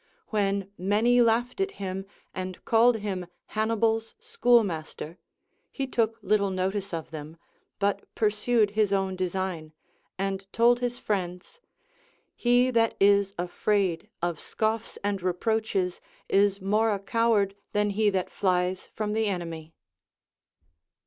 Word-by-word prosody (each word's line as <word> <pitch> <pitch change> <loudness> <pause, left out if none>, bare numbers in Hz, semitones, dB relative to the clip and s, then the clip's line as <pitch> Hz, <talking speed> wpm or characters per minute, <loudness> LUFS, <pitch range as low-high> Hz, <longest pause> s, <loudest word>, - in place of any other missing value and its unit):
AVhen 200 -2 +1
many 220 +6 +3
laughed 240 +6 +2
at 390 0 -1
him 195 0 -4 0.3
and 185 -1 -6
called 235 +1 +5
him 195 -4 -4 0.2
Hannibal's 225 +1 0
schoolmaster, 225 - +1 0.5
he 275 - -2
took 230 -3 0
little 200 0 +2
notice 190 +1 -2
of 165 -2 -5
them, 155 +1 -8 0.4
but 200 0 0
pursued 215 0 +2
his 210 -1 +1
own 195 -1 0
design, 185 -3 -3 0.4
and 195 0 -3
told 240 +1 +4
his 245 0 -2
friends: 185 - -3 0.8
He 245 +1 +3
that 230 -2 +2
is 200 0 +4
afraid 180 0 0
of 175 -3 -1
scoffs 220 +1 -2
and 200 -1 -1
reproaches 185 0 -1 0.3
is 200 0 +3
more 210 +3 +2
a 205 - +1
coward 205 -1 +1 0.2
than 210 0 +1
he 210 +1 +2
that 190 -2 -1
flies 185 -1 0
from 210 -1 -2
the 220 0 +1
enemy. 165 -4 -4
200 Hz, 125 wpm, -27 LUFS, 185-225 Hz, 0.8 s, called